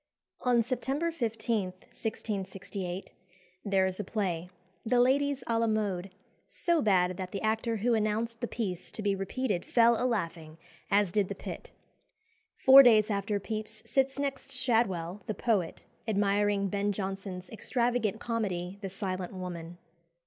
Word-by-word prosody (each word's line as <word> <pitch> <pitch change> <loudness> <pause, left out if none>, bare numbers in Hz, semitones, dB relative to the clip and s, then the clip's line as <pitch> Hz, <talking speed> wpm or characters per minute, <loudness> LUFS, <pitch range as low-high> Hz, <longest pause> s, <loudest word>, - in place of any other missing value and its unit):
On 245 -2 +3
September 270 +7 -1
15, 225 - -1 0.2
1668, 195 -3 -4 0.5
there 195 -2 +2
is 185 +1 -3
a - - -1
play 180 -4 -2 0.3
"The 245 +2 +2
Ladies 275 +1 +2
à 230 -1 +1
la 230 - +2
Mode" 200 -4 -1 0.4
so 340 -2 +1
bad 185 -4 +3
that 185 -1 -5
the 200 - -4
actor 225 +1 0
who 235 +3 +1
announced 225 +2 0
the 240 - -1
piece 190 -8 -4
to 215 - -5
be 200 -1 +2
repeated 195 0 -2
fell 235 0 +4
a - - +2
laughing, 165 -8 -3 0.3
as 200 -2 +3
did 205 0 +2
the - - -4
pit. - - -7 0.9
Four 270 +1 +9
days 220 -4 +5
after 200 0 0
Pepys 215 +1 -6
sits 270 +3 +1
next 280 -1 -3
Shadwell, 210 -8 +1
the 215 - -2
poet, 195 -6 0 0.2
admiring 205 -1 +2
Ben 205 +1 0
Jonson's 190 -2 -5
extravagant 235 -1 0
comedy, 195 -6 -2
"The 195 - -4
Silent 185 -1 -4
Woman." 175 -2 -6
210 Hz, 145 wpm, -30 LUFS, 190-235 Hz, 0.9 s, Four